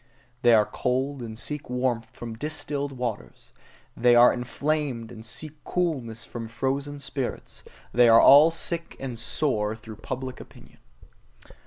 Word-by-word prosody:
They 120 Hz, -1 st, +6 dB
are 105 Hz, -1 st, +5 dB
cold, 130 Hz, +3 st, -2 dB
and 110 Hz, -2 st, -7 dB
seek 150 Hz, +3 st, -5 dB
warmth 125 Hz, -2 st, -1 dB
from 115 Hz, -1 st, -7 dB
distilled 145 Hz, +1 st, -3 dB
waters: 125 Hz, -5 st, -6 dB, 0.4 s
they 120 Hz, 0 st, +4 dB
are 120 Hz, +1 st, +7 dB
inflamed, 125 Hz, -1 st, -2 dB
and 110 Hz, -2 st, -10 dB
seek 155 Hz, +6 st, -7 dB
coolness 130 Hz, -11 st, -2 dB
from 115 Hz, -1 st, -7 dB
frozen 135 Hz, +5 st, -2 dB
spirits; 140 Hz, -2 st, -5 dB, 0.3 s
they 120 Hz, 0 st, +6 dB
are 115 Hz, 0 st, +8 dB
all 145 Hz, +4 st, +8 dB
sick 165 Hz, 0 st, -4 dB
and 125 Hz, -4 st, -5 dB
sore 110 Hz, -3 st, -1 dB
through 110 Hz, -1 st, -11 dB
public 130 Hz, +2 st, -6 dB
opinion. -, -, -15 dB
125 Hz, 140 wpm, -26 LUFS, 115-145 Hz, 0.4 s, are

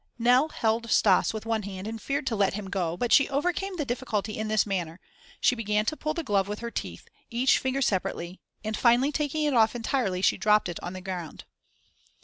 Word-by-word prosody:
Nell 250 Hz, +5 st, +4 dB
held 230 Hz, -3 st, -1 dB
Stas 195 Hz, -3 st, +4 dB
with 220 Hz, 0 st, -6 dB
one 225 Hz, -1 st, 0 dB
hand 190 Hz, -1 st, -7 dB
and 225 Hz, 0 st, -5 dB
feared 275 Hz, +3 st, -2 dB
to 235 Hz, -, -1 dB
let 200 Hz, -2 st, +1 dB
him 200 Hz, -2 st, -6 dB
go, 175 Hz, -3 st, -1 dB
but 240 Hz, +4 st, 0 dB
she 280 Hz, -, +5 dB
overcame 355 Hz, +7 st, -1 dB
the 300 Hz, -, -1 dB
difficulty 225 Hz, -5 st, -2 dB
in 220 Hz, -, -3 dB
this 215 Hz, -1 st, +2 dB
manner: 180 Hz, -4 st, -3 dB, 0.4 s
she -, -, +4 dB
began 210 Hz, -3 st, 0 dB
to 310 Hz, -, -1 dB
pull 310 Hz, 0 st, -3 dB
the 335 Hz, -, -3 dB
glove 200 Hz, -6 st, +1 dB
with 210 Hz, +1 st, -4 dB
her 235 Hz, +1 st, -6 dB
teeth, -, -, -6 dB, 0.2 s
each 245 Hz, +2 st, +3 dB
finger 265 Hz, +1 st, -1 dB
separately, 185 Hz, -3 st, -2 dB, 0.2 s
and, 215 Hz, 0 st, -2 dB
finally 245 Hz, +5 st, +3 dB
taking 300 Hz, +1 st, -1 dB
it 295 Hz, -2 st, +1 dB
off 225 Hz, -1 st, +4 dB
entirely, 225 Hz, -6 st, -1 dB
she -, -, +3 dB
dropped 210 Hz, -3 st, +3 dB
it 170 Hz, -, -5 dB
on 175 Hz, -, -5 dB
the 185 Hz, -, -7 dB
ground. 180 Hz, -4 st, -6 dB
220 Hz, 215 wpm, -27 LUFS, 195-260 Hz, 0.4 s, she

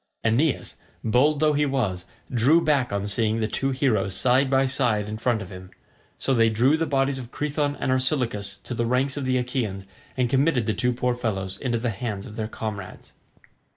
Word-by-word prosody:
Aeneas, 125 Hz, +6 st, +1 dB, 0.3 s
bold 140 Hz, +7 st, +3 dB
though 155 Hz, 0 st, +3 dB
he 150 Hz, 0 st, +2 dB
was, 100 Hz, -10 st, -1 dB, 0.3 s
drew 130 Hz, +8 st, +5 dB
back 140 Hz, -7 st, +1 dB
on 100 Hz, 0 st, -1 dB
seeing 110 Hz, +2 st, 0 dB
the 110 Hz, -, 0 dB
two 135 Hz, +4 st, -1 dB
heroes 120 Hz, -8 st, +1 dB
side 130 Hz, +7 st, +3 dB
by 135 Hz, 0 st, +3 dB
side 120 Hz, -6 st, 0 dB
in 110 Hz, +1 st, -5 dB
front 115 Hz, -3 st, 0 dB
of 95 Hz, -, -12 dB
him, 95 Hz, 0 st, -10 dB, 0.5 s
so 135 Hz, -, 0 dB
they 115 Hz, -2 st, +4 dB
drew 120 Hz, +7 st, +3 dB
the 165 Hz, 0 st, -1 dB
bodies 135 Hz, -1 st, +1 dB
of 120 Hz, -2 st, -8 dB
Crethon 145 Hz, -1 st, -1 dB
and 130 Hz, -, 0 dB
Orsilochus 120 Hz, -7 st, 0 dB
to -, -, -6 dB
the 115 Hz, -1 st, -1 dB
ranks 130 Hz, +3 st, +1 dB
of 145 Hz, -2 st, -3 dB
the 130 Hz, 0 st, +2 dB
Achaeans 120 Hz, -6 st, -2 dB, 0.3 s
and 125 Hz, -1 st, +2 dB
committed 135 Hz, -1 st, +2 dB
the 110 Hz, -, 0 dB
two 125 Hz, +2 st, +1 dB
poor 125 Hz, +1 st, 0 dB
fellows 95 Hz, -6 st, -3 dB
into 120 Hz, -3 st, -1 dB
the 115 Hz, 0 st, -1 dB
hands 105 Hz, -2 st, -4 dB
of 105 Hz, -, -10 dB
their 110 Hz, -1 st, -3 dB
comrades. 105 Hz, -4 st, -7 dB
125 Hz, 200 wpm, -25 LUFS, 110-135 Hz, 0.5 s, drew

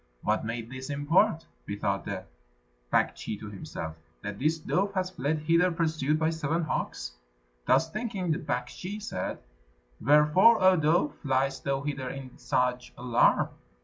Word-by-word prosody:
"What -, -, +1 dB
may 115 Hz, +1 st, -3 dB
this 130 Hz, +3 st, -8 dB
import?" 160 Hz, +5 st, +2 dB, 0.2 s
bethought 100 Hz, -1 st, -2 dB
the 95 Hz, -2 st, -4 dB, 0.7 s
Baktschi 105 Hz, -, 0 dB
to 105 Hz, -1 st, -8 dB
himself, 80 Hz, -5 st, -6 dB, 0.3 s
"that 100 Hz, -1 st, -5 dB
this 155 Hz, +4 st, +2 dB
dove 195 Hz, +5 st, -1 dB
has 185 Hz, -1 st, 0 dB
fled 150 Hz, 0 st, -1 dB
hither 170 Hz, +3 st, +4 dB
pursued 155 Hz, -3 st, +1 dB
by 160 Hz, +1 st, +1 dB
seven 160 Hz, +1 st, -1 dB
hawks?" -, -, -3 dB, 0.6 s
Thus 165 Hz, -, +4 dB
thinking, 205 Hz, -6 st, -2 dB
the 155 Hz, -, 0 dB
Baktschi 170 Hz, +8 st, -4 dB
said, 95 Hz, -, -4 dB, 0.7 s
"Wherefore, 150 Hz, -, +6 dB
O 185 Hz, 0 st, +6 dB
dove, 160 Hz, -1 st, +2 dB
fliest 135 Hz, 0 st, +1 dB
thou 135 Hz, 0 st, -1 dB
hither 140 Hz, -3 st, -3 dB
in 135 Hz, -1 st, -8 dB
such 125 Hz, 0 st, 0 dB
alarm?" 120 Hz, -1 st, +3 dB
150 Hz, 145 wpm, -28 LUFS, 125-170 Hz, 0.7 s, Wherefore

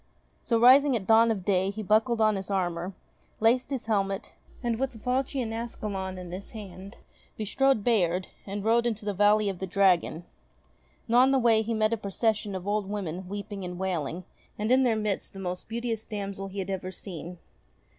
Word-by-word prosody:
So, 230 Hz, -2 st, +1 dB
rising 265 Hz, +3 st, +7 dB
at 205 Hz, -5 st, -2 dB
dawn 225 Hz, +2 st, +6 dB
of 200 Hz, -5 st, -2 dB
day, 190 Hz, -1 st, +2 dB
he 215 Hz, +2 st, -5 dB
buckled 220 Hz, +3 st, +2 dB
on 215 Hz, -1 st, +4 dB
his 195 Hz, 0 st, -5 dB
armour, 180 Hz, -1 st, -2 dB, 0.4 s
laced 235 Hz, +4 st, +3 dB
his 270 Hz, -4 st, -3 dB
helmet, 195 Hz, -3 st, -1 dB, 0.3 s
and 235 Hz, -1 st, -1 dB
with 270 Hz, 0 st, -1 dB
the -, -, -11 dB
falchion 250 Hz, 0 st, -1 dB
Ascalon 205 Hz, -5 st, -4 dB
in 180 Hz, -1 st, -8 dB
his 190 Hz, +5 st, -8 dB
hand, 195 Hz, -1 st, -9 dB, 0.4 s
bestrode 265 Hz, +2 st, +1 dB
Bayard, 185 Hz, -6 st, +2 dB, 0.2 s
and 200 Hz, +1 st, -4 dB
rode 235 Hz, +1 st, +3 dB
into 220 Hz, -2 st, -3 dB
the 205 Hz, -, -1 dB
Valley 210 Hz, +2 st, +4 dB
of 190 Hz, -3 st, -3 dB
the 190 Hz, -, -3 dB
Dragon. 180 Hz, -3 st, +2 dB, 0.8 s
Now 240 Hz, +1 st, +4 dB
on 260 Hz, +1 st, +6 dB
the 270 Hz, -, +3 dB
way 230 Hz, -3 st, +4 dB
he 225 Hz, +1 st, -2 dB
met 215 Hz, +1 st, +2 dB
a -, -, 0 dB
procession 210 Hz, 0 st, -1 dB
of 185 Hz, +1 st, -6 dB
old 205 Hz, -1 st, 0 dB
women 185 Hz, -3 st, -4 dB
weeping 205 Hz, 0 st, -5 dB
and 180 Hz, 0 st, -5 dB
wailing 180 Hz, -2 st, -2 dB, 0.3 s
and 215 Hz, +3 st, -1 dB
in 260 Hz, +1 st, +5 dB
their 240 Hz, -4 st, +3 dB
midst 210 Hz, -2 st, -2 dB
the 195 Hz, -, -9 dB
most 180 Hz, -1 st, -4 dB
beauteous 230 Hz, -1 st, -3 dB
damsel 200 Hz, -2 st, -5 dB
he 195 Hz, +1 st, -10 dB
had 195 Hz, 0 st, -3 dB
ever 185 Hz, -1 st, -3 dB
seen. 180 Hz, -2 st, -8 dB
205 Hz, 195 wpm, -28 LUFS, 190-230 Hz, 0.8 s, rising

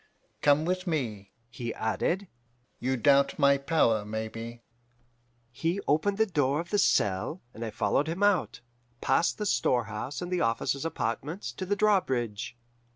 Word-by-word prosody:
Come 145 Hz, +2 st, +4 dB
with 185 Hz, +1 st, -1 dB
me,' 115 Hz, -, -2 dB, 0.2 s
he 120 Hz, 0 st, -5 dB
added. 175 Hz, -, -1 dB, 0.5 s
'You 130 Hz, +2 st, 0 dB
doubt 140 Hz, +3 st, +4 dB
my 140 Hz, -1 st, +4 dB
power, 135 Hz, -8 st, +2 dB
maybe.' 115 Hz, +2 st, -6 dB, 0.9 s
"He 165 Hz, +10 st, -1 dB
opened 195 Hz, +7 st, +2 dB
the 220 Hz, -, +4 dB
door 145 Hz, -7 st, +1 dB
of 170 Hz, +1 st, -6 dB
the 205 Hz, -, +2 dB
cell, 105 Hz, -, +2 dB
and 115 Hz, -, -7 dB
I 115 Hz, -, -3 dB
followed 110 Hz, +8 st, 0 dB
him 170 Hz, +5 st, -2 dB
out, 195 Hz, -11 st, +2 dB, 0.4 s
past 135 Hz, +6 st, +2 dB
the 210 Hz, -, -3 dB
storehouse 120 Hz, -, 0 dB
and 180 Hz, 0 st, -5 dB
the 180 Hz, -, +1 dB
officers' 115 Hz, +5 st, 0 dB
apartments, 150 Hz, -, -3 dB
to 185 Hz, -, -6 dB
the 205 Hz, -, +1 dB
drawbridge. 130 Hz, -, 0 dB
140 Hz, 150 wpm, -28 LUFS, 115-175 Hz, 0.9 s, Come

